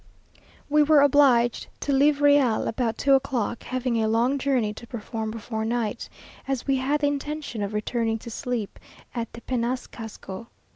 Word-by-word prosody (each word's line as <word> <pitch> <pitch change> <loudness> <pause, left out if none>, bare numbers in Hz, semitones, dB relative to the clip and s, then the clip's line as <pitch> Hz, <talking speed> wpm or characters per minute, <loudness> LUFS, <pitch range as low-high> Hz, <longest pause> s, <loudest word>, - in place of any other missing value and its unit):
We 300 +1 +4
were 300 -1 +6
obliged 260 -4 +4
to 285 - 0
leave 285 +1 +3
Real 285 -6 +4
about 225 -1 -1
two 275 - +3
o'clock, 255 -4 0
having 255 -3 -1
a 220 - +1
long 240 +5 +2
journey 255 -6 +1
to 235 - -11
perform 220 -1 -5
before 220 0 -4
night, 230 0 -2 0.4
as 270 -3 -2
we 275 -1 +2
had 280 +3 0
the 290 - +3
intention 285 -4 -3
of 200 +1 -3
returning 225 +1 -1
to 230 +1 -9
sleep 240 -3 -4 0.3
at 235 -4 -4
Tepenacasco. 235 -3 -5
245 Hz, 155 wpm, -25 LUFS, 225-275 Hz, 0.4 s, were